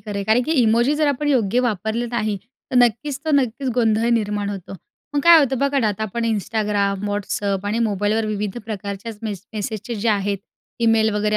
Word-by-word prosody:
खरं 210 Hz, -2 st, -7 dB
आहे, 200 Hz, -, -2 dB
कारण 220 Hz, +4 st, +3 dB
की 320 Hz, -, 0 dB
इमोजी 235 Hz, +5 st, +3 dB
जर 305 Hz, -1 st, +2 dB
आपण 290 Hz, +2 st, -1 dB
योग्य 245 Hz, -4 st, +2 dB
वापरलं 225 Hz, 0 st, -1 dB
नाही 215 Hz, -4 st, -1 dB, 0.3 s
तर 255 Hz, -, 0 dB
नक्कीच 245 Hz, +4 st, +2 dB
तर 315 Hz, -, -1 dB
नक्कीच 260 Hz, 0 st, 0 dB
गोंधळ 225 Hz, 0 st, +2 dB
निर्माण 205 Hz, -1 st, -2 dB
होतो. 195 Hz, -1 st, -7 dB, 0.4 s
मग 285 Hz, -, +2 dB
काय 340 Hz, +1 st, +8 dB
होतं 270 Hz, -4 st, +1 dB
बघा 280 Hz, 0 st, +1 dB
ना 225 Hz, -, +2 dB
आता 210 Hz, +1 st, -3 dB
आपण 230 Hz, +3 st, -2 dB
Instagram, 205 Hz, -2 st, 0 dB
WhatsApp 200 Hz, -1 st, -2 dB
आणि 215 Hz, +3 st, 0 dB
मोबाईलवर 210 Hz, +2 st, 0 dB
विविध 210 Hz, +1 st, -3 dB
प्रकारच्याच 205 Hz, 0 st, -6 dB
मेस 205 Hz, -4 st, -4 dB
मेसेजचे 215 Hz, +2 st, -4 dB
जे 225 Hz, +1 st, -1 dB
आहेत 200 Hz, -1 st, +1 dB, 0.5 s
ईमेल 220 Hz, -1 st, +4 dB
वगैरे 210 Hz, +1 st, +1 dB
220 Hz, 190 wpm, -21 LUFS, 205-240 Hz, 0.5 s, काय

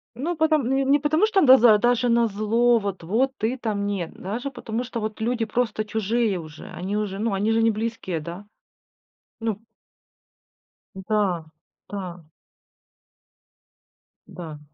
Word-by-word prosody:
Ну 330 Hz, +8 st, -2 dB
потом, 310 Hz, -5 st, +2 dB
не 275 Hz, +2 st, +3 dB
потому 310 Hz, +7 st, +2 dB
что 395 Hz, -3 st, +2 dB
н 295 Hz, -, +4 dB
даза 245 Hz, -4 st, +8 dB
даже 245 Hz, +2 st, +2 dB
на 235 Hz, 0 st, +4 dB
зло, 225 Hz, +3 st, +2 dB
вот 195 Hz, -4 st, -4 dB
вот 240 Hz, +10 st, +1 dB
ты 235 Hz, +5 st, -1 dB
там 210 Hz, -4 st, -2 dB
нет, 195 Hz, -5 st, -3 dB
даже 230 Hz, +9 st, -4 dB
потому 240 Hz, -2 st, -4 dB
что 245 Hz, -2 st, -5 dB
вот 215 Hz, 0 st, -5 dB
люди 230 Hz, 0 st, 0 dB
просто 225 Hz, -1 st, -1 dB
чужие 220 Hz, -1 st, 0 dB
уже, 155 Hz, -2 st, -10 dB
они 190 Hz, +4 st, -3 dB
уже, 205 Hz, -2 st, -3 dB
ну 225 Hz, -1 st, 0 dB
они 205 Hz, +3 st, +1 dB
же 225 Hz, -, +3 dB
не 225 Hz, 0 st, +4 dB
близкие, 215 Hz, -6 st, -3 dB
да? 170 Hz, +6 st, -8 dB, 0.9 s
Ну. 225 Hz, -3 st, -2 dB, 1.4 s
Да, 190 Hz, -4 st, -1 dB, 0.4 s
да. 180 Hz, -4 st, -6 dB, 2.0 s
Да. 160 Hz, -4 st, -8 dB
220 Hz, 145 wpm, -24 LUFS, 200-245 Hz, 2.0 s, даза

